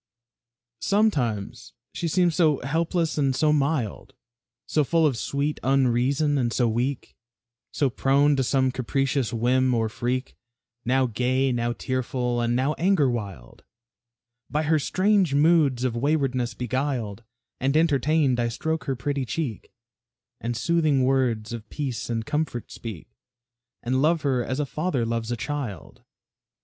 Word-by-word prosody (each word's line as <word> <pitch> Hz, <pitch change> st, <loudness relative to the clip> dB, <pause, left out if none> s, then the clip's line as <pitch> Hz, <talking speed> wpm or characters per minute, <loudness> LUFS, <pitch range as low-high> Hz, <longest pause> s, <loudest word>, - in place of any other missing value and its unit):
Sometimes 125 Hz, -, 0 dB, 0.2 s
she 170 Hz, -, -3 dB
seems 175 Hz, +1 st, +2 dB
so 155 Hz, -4 st, +3 dB
helpless 165 Hz, +3 st, -1 dB
and 135 Hz, -2 st, +1 dB
so 150 Hz, +2 st, +3 dB
mild, 140 Hz, -6 st, -1 dB, 0.5 s
So 155 Hz, -, +1 dB
full 165 Hz, +3 st, +2 dB
of 140 Hz, -5 st, +2 dB
sweet 140 Hz, +6 st, -2 dB
unreason 135 Hz, +3 st, +2 dB
and 120 Hz, -2 st, 0 dB
so 120 Hz, 0 st, +1 dB
weak, 120 Hz, +4 st, -2 dB, 0.6 s
So 140 Hz, -4 st, 0 dB
prone 140 Hz, +3 st, +3 dB
to 135 Hz, -, +1 dB
some 130 Hz, +1 st, +2 dB
capricious 135 Hz, 0 st, -1 dB
whim 125 Hz, +2 st, +2 dB
or 115 Hz, -1 st, 0 dB
freak; 130 Hz, +2 st, -3 dB, 0.5 s
Now 130 Hz, +2 st, +2 dB
gay, 130 Hz, +3 st, 0 dB
now 120 Hz, -1 st, -1 dB
tearful, 125 Hz, -1 st, -2 dB
and 120 Hz, 0 st, +1 dB
now 135 Hz, +4 st, +1 dB
anger 170 Hz, -7 st, +3 dB
wild, 100 Hz, -, -7 dB, 0.9 s
By 150 Hz, +2 st, 0 dB
her 155 Hz, 0 st, +2 dB
strange 185 Hz, -1 st, +2 dB
moods 145 Hz, -5 st, +3 dB
of 125 Hz, -3 st, 0 dB
waywardness 130 Hz, -2 st, 0 dB
beguiled 125 Hz, -4 st, -2 dB, 0.4 s
And 135 Hz, +3 st, +1 dB
entertained, 145 Hz, -3 st, +2 dB
I 120 Hz, -, +1 dB
stroke 160 Hz, +7 st, -3 dB
her 135 Hz, -, -1 dB
pretty 140 Hz, +2 st, -2 dB
cheek, 130 Hz, -2 st, -4 dB, 0.7 s
And 120 Hz, 0 st, -3 dB
soothing 155 Hz, -3 st, +2 dB
words 125 Hz, -4 st, +1 dB
of 110 Hz, -2 st, -7 dB
peace 135 Hz, -6 st, -4 dB
and 115 Hz, -1 st, -2 dB
comfort 150 Hz, -5 st, -3 dB
speak; 110 Hz, -8 st, -8 dB, 0.8 s
And 130 Hz, +2 st, 0 dB
love 160 Hz, +2 st, +2 dB
her 130 Hz, -4 st, +1 dB
as 130 Hz, +3 st, -3 dB
a 150 Hz, -, 0 dB
father 150 Hz, -4 st, -1 dB
loves 115 Hz, 0 st, -2 dB
a 120 Hz, -, -1 dB
child. 120 Hz, -, -5 dB
130 Hz, 140 wpm, -25 LUFS, 120-150 Hz, 0.9 s, so